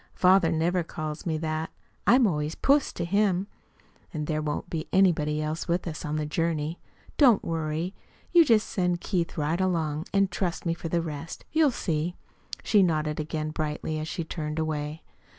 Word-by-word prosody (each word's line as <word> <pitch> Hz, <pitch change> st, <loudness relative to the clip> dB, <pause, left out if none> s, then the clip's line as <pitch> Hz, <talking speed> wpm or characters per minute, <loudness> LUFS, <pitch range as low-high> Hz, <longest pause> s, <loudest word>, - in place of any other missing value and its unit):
"Father 185 Hz, -2 st, +5 dB
never 170 Hz, +3 st, +1 dB
calls 155 Hz, -1 st, -5 dB
me 160 Hz, -1 st, 0 dB
that. 155 Hz, 0 st, -2 dB, 0.4 s
I'm 250 Hz, 0 st, +6 dB
always 150 Hz, -5 st, 0 dB
'Puss' 280 Hz, +1 st, +3 dB
to 170 Hz, -, -3 dB
him. 195 Hz, 0 st, +2 dB, 0.7 s
And 155 Hz, -4 st, -3 dB
there 155 Hz, 0 st, -1 dB
won't 150 Hz, -1 st, -3 dB
be 160 Hz, -2 st, -4 dB
anybody 155 Hz, -5 st, +3 dB
else 155 Hz, +4 st, -3 dB
with 175 Hz, +1 st, 0 dB
us 155 Hz, -2 st, -5 dB
on 150 Hz, 0 st, -2 dB
the 155 Hz, -1 st, -1 dB
journey. 160 Hz, +1 st, -1 dB, 0.4 s
Don't 250 Hz, -8 st, +6 dB
you -, -, -5 dB
worry. 160 Hz, +3 st, -2 dB, 0.4 s
You 345 Hz, -1 st, +8 dB
just 225 Hz, -7 st, +3 dB
send 180 Hz, -2 st, 0 dB
Keith 175 Hz, -2 st, -2 dB
right 155 Hz, +4 st, 0 dB
along, 160 Hz, -3 st, 0 dB
and 195 Hz, -1 st, +2 dB
trust 175 Hz, 0 st, -2 dB
me 165 Hz, -, +1 dB
for 165 Hz, -1 st, -6 dB
the 170 Hz, 0 st, +1 dB
rest. 160 Hz, 0 st, -6 dB
You'll 315 Hz, -2 st, +4 dB
see," 170 Hz, -, -2 dB, 0.5 s
she 210 Hz, -, +4 dB
nodded 155 Hz, -4 st, +1 dB
again 155 Hz, 0 st, -3 dB
brightly, 155 Hz, 0 st, -3 dB
as 155 Hz, -, -4 dB
she 170 Hz, -, -3 dB
turned 155 Hz, -1 st, -4 dB
away. 155 Hz, -1 st, -3 dB
165 Hz, 180 wpm, -27 LUFS, 155-180 Hz, 0.7 s, You